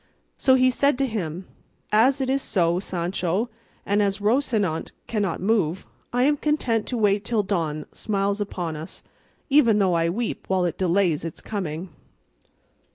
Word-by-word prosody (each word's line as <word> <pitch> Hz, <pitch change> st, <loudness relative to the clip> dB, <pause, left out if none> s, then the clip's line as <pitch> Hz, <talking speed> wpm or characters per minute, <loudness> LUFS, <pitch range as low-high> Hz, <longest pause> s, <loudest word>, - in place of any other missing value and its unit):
So 260 Hz, -, +4 dB
he 255 Hz, 0 st, +4 dB
said 280 Hz, +1 st, +2 dB
to 275 Hz, -, +1 dB
him, 185 Hz, -, -4 dB, 0.5 s
"As 260 Hz, +6 st, +4 dB
it 265 Hz, -, 0 dB
is 270 Hz, +1 st, +1 dB
so, 175 Hz, -5 st, +1 dB
Sancho, 185 Hz, +4 st, -2 dB, 0.3 s
and 205 Hz, +1 st, +2 dB
as 200 Hz, -1 st, +1 dB
Rocinante 210 Hz, -, 0 dB
cannot 205 Hz, -6 st, -1 dB
move, 190 Hz, -4 st, +1 dB, 0.3 s
I 245 Hz, +1 st, +2 dB
am 290 Hz, +2 st, +3 dB
content 255 Hz, -8 st, 0 dB
to 250 Hz, -, -2 dB
wait 205 Hz, -2 st, +2 dB
till 220 Hz, 0 st, 0 dB
dawn 160 Hz, -6 st, -2 dB
smiles 200 Hz, -1 st, -1 dB
upon 175 Hz, -5 st, -3 dB
us, 155 Hz, +2 st, -9 dB, 0.5 s
even 240 Hz, -7 st, +5 dB
though 190 Hz, -3 st, +3 dB
I 165 Hz, 0 st, +2 dB
weep 225 Hz, +6 st, -3 dB
while 185 Hz, -1 st, +2 dB
it 175 Hz, -, -3 dB
delays 180 Hz, -4 st, +2 dB
its 165 Hz, -2 st, -6 dB
coming." 180 Hz, -4 st, -4 dB
200 Hz, 160 wpm, -24 LUFS, 175-235 Hz, 0.5 s, even